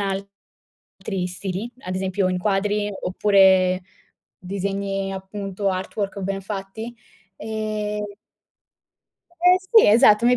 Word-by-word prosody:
altri 195 - -6
stili, 190 +5 -4
ad 185 0 -5
esempio 190 0 0
in 185 - 0
quadri 205 +2 0
oppure 190 -1 +4 0.6
disegni 195 +1 -3
appunto, 195 0 -3
artwork 195 +2 -3
ben 195 +1 -3
fatti. 205 +4 -6 0.4
Ehm 215 -1 -3 1.4
Eh 360 +1 +6 0.3
sì, - - +5
esatto, 215 0 +6
mi 250 0 +5
195 Hz, 100 wpm, -23 LUFS, 190-210 Hz, 1.4 s, Eh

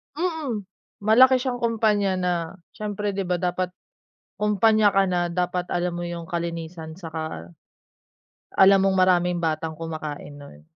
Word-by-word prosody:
Mm. 310 - -2 0.4
Malaki 255 +5 +6
siyang 250 -1 -2
kumpanya 215 -4 +1
na, 180 -1 0 0.4
siyempre 210 -1 -3
'di 195 -2 -3
ba 180 - +1
dapat 180 +1 -1 0.7
kumpanya 210 0 +4
ka 195 0 +3
na, 175 -2 0
dapat 180 0 -2
alam 175 0 -1
mo 175 0 -4
yung 170 -1 -5
kalinisan, 165 -1 -5
'saka 160 - -6 1.0
alam 195 0 +6
mong 190 -1 +2
maraming 180 -1 +3
batang 160 0 -1
kumakain 155 -3 -6
nun. 110 - -13
180 Hz, 135 wpm, -24 LUFS, 165-210 Hz, 1.0 s, Malaki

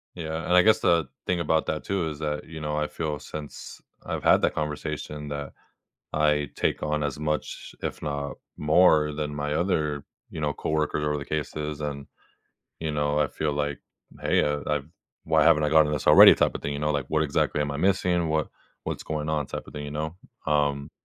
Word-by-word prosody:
Yeah. 80 -1 -4
And 90 - +1
I 90 - +8
guess 110 0 +4
the 85 -4 +3 0.2
thing 90 -1 0
about 80 0 +1
that 75 - -2
too 95 -4 -1
is 75 -2 -6
that, 75 -1 -3
you 80 -1 -8
know, 75 0 -2
I 75 0 0
feel 75 -3 -3
since 75 0 -8 0.2
I've - - -4
had - - +5
that - - +2
conversation 75 0 -4
that 70 -1 -5 0.6
I 75 -1 +2
take - - 0
on 75 0 0
as 75 -1 -2
much, 75 0 -3
if - - -4
not 70 -1 -3 0.2
more, 75 -1 +4
than 75 -1 -3
my 75 0 -2
other, 75 -4 0 0.3
you 80 - -6
know, 75 -1 0
coworker 75 +1 -1
over 75 0 0
the 70 - -6
cases. 75 0 -4
And, 70 -2 -4 0.7
you 80 -1 -2
know, 75 0 0
I 75 - +3
feel 75 -1 -2
like, 75 0 -2 0.4
hey, - - +2
I 75 0 0 0.2
I've 75 0 -6 0.4
why 80 -1 +3
haven't 80 -2 +5
I 75 - +2
gotten 75 -1 +4
this 75 - -3
already - - +10
type - - +1
of - - -6
thing, 70 - -2
you 70 - -4
know? 75 +1 0
Like, 70 -2 0
what 80 0 +2
exactly 75 0 0
am 75 -1 0
I 70 - -3
missing? 90 0 +1
What 80 0 0 0.4
what's - - -4
going 75 -1 -3
on 75 -2 0
type - - -6
of - - -12
thing, 75 0 -6
you 75 - -6
know? 80 +3 -4 0.3
Um 70 -1 +1
75 Hz, 210 wpm, -26 LUFS, 75-80 Hz, 0.7 s, already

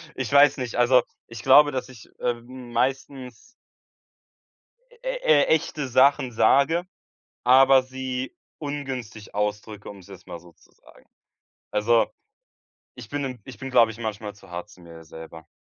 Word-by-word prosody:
Ich 130 -4 -4
weiß 145 0 +5
nicht. 125 -3 -5
Also, 125 +1 +4 0.3
ich 115 - -9
glaube, 145 +2 +6
dass 130 -1 -4
ich, 125 -5 -14
ähm, 120 +1 -5
meistens 130 -1 -3 1.6
e - - -3
e 485 -1 +4
echte 150 -2 0
Sachen 130 0 +3
sage, 140 +9 +2 0.6
aber 130 +1 +6
sie 130 0 -6 0.2
ungünstig 130 -7 -7
ausdrücke, 105 0 -4
um's 100 -3 -13
jetzt 95 -3 -14
mal 85 - -8
so 85 +1 -18
zu - - -27
sagen. - - -22 0.7
Also, 115 +2 +2 0.9
ich 125 -4 -11
bin 145 +2 -3
im 130 -3 -6
ich 130 - -12
bin, 135 - -7
glaube 120 -3 +4
ich, 110 - -14
manchmal 110 -2 -5
zu 95 -2 -18
hart 90 +3 -7
zum 90 - -17
mir 85 -1 -13
selber. 80 +1 -12
125 Hz, 150 wpm, -24 LUFS, 105-135 Hz, 1.6 s, glaube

